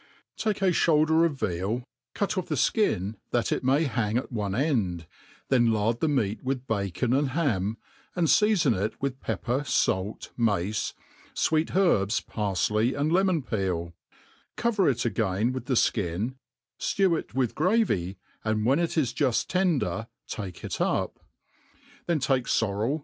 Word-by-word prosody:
TAKE 210 -2 -1
a 185 - +4
flioulder 160 -1 +3
of 155 - -5
veal, 100 +4 -1 0.3
cut 200 - -1
off 185 -2 -2
the 155 - -1
flcin 110 - +1
that 120 -1 0
it - - 0
may 135 +5 +3
hang 115 -6 0
atone 105 -6 -2
end, 110 - 0 0.4
then 120 -3 +4
lard 110 +2 +1
the 160 - +1
meat 115 -8 0
with 130 -1 -2
bacon 105 +2 -1
and 140 +1 +2
ham, 110 - 0 0.4
and 175 -2 +2
fea 215 +1 +4
fon 170 - +3
it 105 +2 -2
with 135 -1 -3
pepper, 120 +6 -2
fait, 95 -7 -1
mace, 105 -3 0 0.4
fweet 160 +1 +1
herbs, 115 - +3
parfley, 105 - 0
and 150 +2 +1
le^ 185 +3 +4
mon 180 -7 +1
peet; 90 -7 -2 0.6
cove;* 235 -3 0
it 125 -3 +1
again 110 0 0
with 130 - -5
the 130 -4 +2
(kin, 105 +5 -2 0.4
fiew 190 -4 +2
it - - -11
with 130 -3 +1
gravy, 155 - +1 0.3
and 110 -1 0
when 135 +6 +3
it 170 -1 -1
is 130 -6 +1
juft 130 -6 +1
tender 140 - 0 0.2
take 95 -5 -6
it - - -4
up; - - 0 0.9
then 170 -2 +2
take 135 -3 +1
forrel 115 +7 0
120 Hz, 155 wpm, -27 LUFS, 105-155 Hz, 0.9 s, a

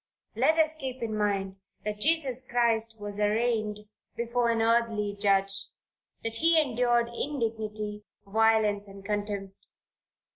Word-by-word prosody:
Let 320 - +3
us 315 -1 +4
keep 260 -5 -6
in 220 -2 -2
mind, 195 -2 -1 0.3
that 210 0 -3
Jesus 275 -3 +2
Christ 230 -2 +1
was 205 0 -6
arraigned 215 0 0 0.3
before 235 0 0
an 230 -1 +1
earthly 225 -3 +1
judge, 195 -1 +2 0.6
that 225 0 0
he 330 +2 +4
endured 240 -4 +2
indignity, 220 -5 -3 0.2
violence 215 -1 +2
and 195 0 -12
contempt. 205 -2 -4
220 Hz, 120 wpm, -28 LUFS, 205-240 Hz, 0.6 s, us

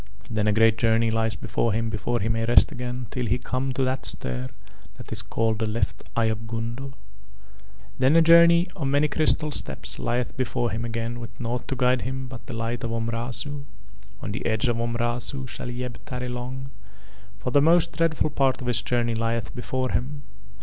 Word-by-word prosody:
Then 105 -1 +1
a - - +4
great 110 +1 +4
journey 115 0 +3
lies 110 -1 +1
before 110 +4 -1
him 115 +1 0
before 120 +2 -1
he 105 - 0
may 115 0 0
rest 120 - +6
again 125 0 -4
till 125 -2 -2
he 120 +4 +2
come 130 +2 -2
to 135 - 0
that 130 +1 -1
star 65 0 -2 0.5
that - - -11
is - - -3
called 110 -1 0
the 110 - 0
left 105 -1 -1
eye 115 - +3
of 110 0 -1
Gundo. 115 +4 -4 1.1
Then 135 +4 +4
a 165 - +7
journey 170 +1 +7
of 140 -7 -2
many 145 +2 +3
crystal 155 0 +2
steps - - -3
lieth 120 +1 -1
before 120 -2 -1
him 115 +2 -2
again 115 +1 -3
with 115 - -9
nought 120 +1 -3
to 135 - -1
guide 125 -1 +2
him 130 +1 -3
but 130 -2 -10
the 120 - -5
light 115 +1 -3
of 115 - -1
Omrazu. 120 +5 -2 0.6
On - - -3
the 105 - -4
edge 110 +2 +1
of 120 -1 +1
Omrazu 120 +3 -1
shall 120 - -6
Yeb 125 0 -4
tarry 125 -1 -4
long, 130 +2 -5 0.7
for 125 - -3
the 145 - +5
most 165 +3 +4
dreadful 165 -2 +1
part 135 -2 +2
of 125 - -6
his 120 -2 +2
journey 120 -1 0
lieth 115 0 -1
before 130 +1 -2
him. 140 +3 -2
120 Hz, 195 wpm, -25 LUFS, 115-130 Hz, 1.1 s, a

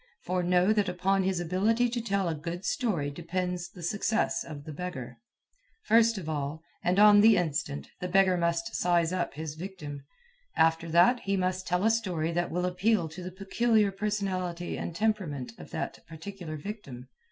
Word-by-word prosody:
For 180 +1 0
know 180 +3 +3
that 210 -3 +1
upon 190 +2 +1
his 190 -1 0
ability 205 +8 +2
to 240 0 -2
tell 200 -4 0
a 165 - 0
good 170 +4 -5
story 175 - 0
depends 175 +2 -3
the 175 -1 -12
success 215 +4 0
of 150 -3 -8
the 155 - -8
beggar. 145 -6 -6 0.6
First 230 - +4
of 175 -5 -6
all, 150 +1 -3 0.2
and 180 +2 +2
on 205 0 +8
the 220 +1 +7
instant, 150 -4 -2
the 180 - -3
beggar 190 0 +4
must 170 -1 -1
"size 175 -1 +2
up" 175 -5 -2
his 155 0 -5
victim. 155 -4 -7 0.6
After 165 +1 +3
that, 175 +10 +5
he 195 -2 -1
must 185 0 -1
tell 180 +2 +1
a 220 - +5
story 180 -8 -1
that 175 +1 -1
will 180 +2 -1
appeal 180 -1 +1
to 160 +4 -9
the 180 +1 -6
peculiar 205 +2 +2
personality 190 -4 -2
and 165 - -5
temperament 170 - -1
of - - -10
that - - -4
particular 165 -1 -7
victim. 145 - -8
180 Hz, 175 wpm, -29 LUFS, 165-200 Hz, 0.6 s, on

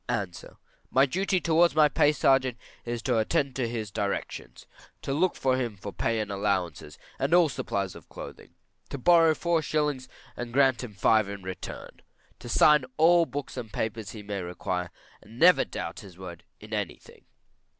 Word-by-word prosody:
A. 100 - 0 0.6
My 135 +1 +4
duty 185 +6 0
towards 170 0 +3
my 155 -1 +6
pay 150 0 +3
sergeant 135 -4 +2 0.3
is 120 -1 -4
to 120 -3 +1
attend 140 +3 0
to 125 -3 -1
his 110 -3 -4
directions, 100 0 -4 0.4
to 135 - -2
look 175 +5 +1
to 130 - +1
him 120 -5 -1
for 100 +1 -8
pay 115 -1 -1
and 105 -1 -3
allowances, 95 -7 -2 0.2
and 140 +6 +2
all 175 -3 +5
supplies 100 -7 -3
of - - -14
clothing; 85 - -11 0.3
to 140 - -5
borrow 165 +3 +5
four 170 0 +1
shillings 150 -4 -1 0.3
and 120 0 -6
give 135 -3 +4
him 115 -5 -8
five 110 +1 +3
in 100 -1 -7
return, 95 0 -8 0.4
to - - -9
sign 150 -2 +5
all 170 +1 +5
books 140 +2 -6
and 110 -3 -6
papers 110 -1 -3
he 105 -2 -9
may 100 -1 -4
require, 90 0 -4 0.3
and 110 - -16
to - - -13
never 180 - +6
doubt - - -6
his 95 -3 -13
word 85 -2 -10
in 110 +1 -11
any 105 -4 -2
thing. - - -19
120 Hz, 180 wpm, -27 LUFS, 100-150 Hz, 0.6 s, my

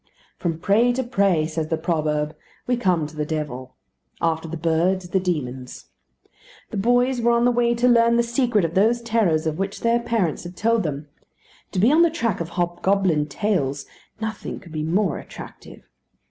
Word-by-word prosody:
From 165 -3 -1
prey 215 +8 +3
to 260 +1 -1
prey, 195 -9 +2
says 160 0 -3
the 160 0 -1
proverb, 155 -2 -1 0.3
we 245 - +1
come 180 -9 +1
to 155 +1 -10
the 150 - -1
devil. 150 -5 -5 0.4
After 165 0 0
the 165 +1 -5
birds, 175 +3 0
the 190 - +2
demons. 130 -8 -4 0.8
The - - -4
boys 245 +4 +2
were 235 - +3
on 235 0 +3
the 245 - +4
way 240 0 +2
to 240 +1 +2
learn 235 -1 +5
the 235 - +3
secret 235 -4 +1
of 165 - -3
those 230 +5 +2
terrors 215 -9 +1
of 160 +1 -2
which 195 +1 -3
their 235 0 +2
parents 225 -9 -1
had 175 0 -9
told 230 +1 +2
them. 150 -4 -4 0.7
To - - -4
be 225 +8 +5
on 315 +3 +5
the 340 - +5
track 235 - -1
of 165 - -4
hobgoblin 175 -2 +1
tales 145 -6 -1 0.3
nothing 220 0 -5
could 170 - -15
be 155 -1 -3
more 175 +3 0
attractive. - - -11
185 Hz, 185 wpm, -23 LUFS, 160-235 Hz, 0.8 s, learn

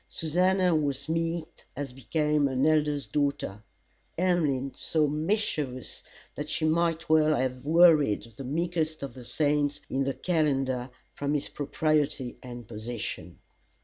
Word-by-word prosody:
Susannah 180 +3 +2
was 145 -3 -1
meek 165 0 -3
as 135 -2 -5
became 150 +3 +1
an 130 +1 +1
Elder's 150 -2 +2
daughter; 140 -9 -1 0.6
Emmeline 150 -7 +1
so 155 -2 +1
mischievous 150 - -1 0.3
that - - -5
she - - -1
might 165 +1 +1
well 155 -1 +4
have 130 0 -2
worried 155 -10 +5
the 135 - -7
meekest 160 +2 -1
of 135 -3 -5
the 125 - -10
saints 145 +1 +1
in 135 +1 +1
the 135 - -1
calendar 135 -7 0 0.2
from 145 +1 -1
his 145 - -2
propriety 145 -3 0
and 120 -2 -9
position. 115 +1 -5
150 Hz, 130 wpm, -28 LUFS, 135-160 Hz, 0.6 s, worried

